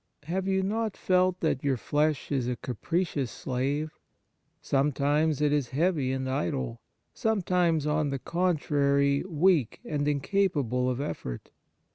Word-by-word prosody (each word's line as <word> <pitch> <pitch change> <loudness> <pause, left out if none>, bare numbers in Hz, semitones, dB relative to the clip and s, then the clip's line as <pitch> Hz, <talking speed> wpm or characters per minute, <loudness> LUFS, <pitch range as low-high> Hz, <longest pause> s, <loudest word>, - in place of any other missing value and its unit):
Have 185 +5 -2
you 190 0 +1
not 220 +2 -1
felt 185 0 +2
that 155 -5 0
your 135 -2 +1
flesh 150 +4 0
is 130 -4 0
a 125 - -1
capricious 140 - -2
slave? 140 +6 -2 0.7
Sometimes 145 +2 +1
it 150 -1 +3
is 140 -5 0
heavy 145 -2 +1
and 130 0 -2
idle, 65 - -2 0.3
sometimes, 180 -7 +1
on 150 -1 +1
the 140 - -2
contrary, 140 -3 +1
weak 165 - +2
and 145 -1 -1
incapable 145 - +1
of 125 - -1
•effort. 130 - -5
145 Hz, 130 wpm, -28 LUFS, 135-175 Hz, 0.7 s, it